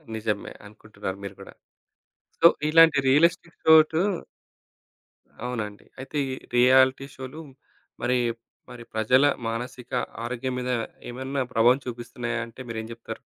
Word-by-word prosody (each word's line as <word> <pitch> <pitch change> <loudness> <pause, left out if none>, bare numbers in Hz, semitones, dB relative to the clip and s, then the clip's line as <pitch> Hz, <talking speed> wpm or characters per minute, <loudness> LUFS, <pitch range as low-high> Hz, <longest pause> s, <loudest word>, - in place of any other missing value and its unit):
నిజమే 105 -2 -3
అనుకుంటున్నారు 105 -2 -8
మీరు 100 -1 -7
గూడా. 100 - -11 0.9
సో, 170 - +9 0.2
ఇలాంటి 160 -2 +6
రియలిస్టిక్ 165 +3 +2
ఘాట్ 160 0 +6 1.5
అవునండి. 110 -4 -5
అయితే 135 +3 -8
ఈ - - -3 0.2
రియాలిటీ 130 +2 +5
షోలు 130 +4 -8 0.6
మరి, 125 +1 +2 0.5
మరి 120 -1 -10
ప్రజల 125 +5 +3 0.2
మానసిక 120 +2 -6 0.3
ఆరోగ్యం 125 +2 -3
మీద 125 0 -3 0.4
ఏమైనా 130 +2 -3
ప్రభావం 120 +4 +4
చూపిస్తున్నాయాంటే 120 0 -5
మీరేం 110 -1 -5
జెప్తారు? 115 0 -9
125 Hz, 110 wpm, -25 LUFS, 115-135 Hz, 1.5 s, సో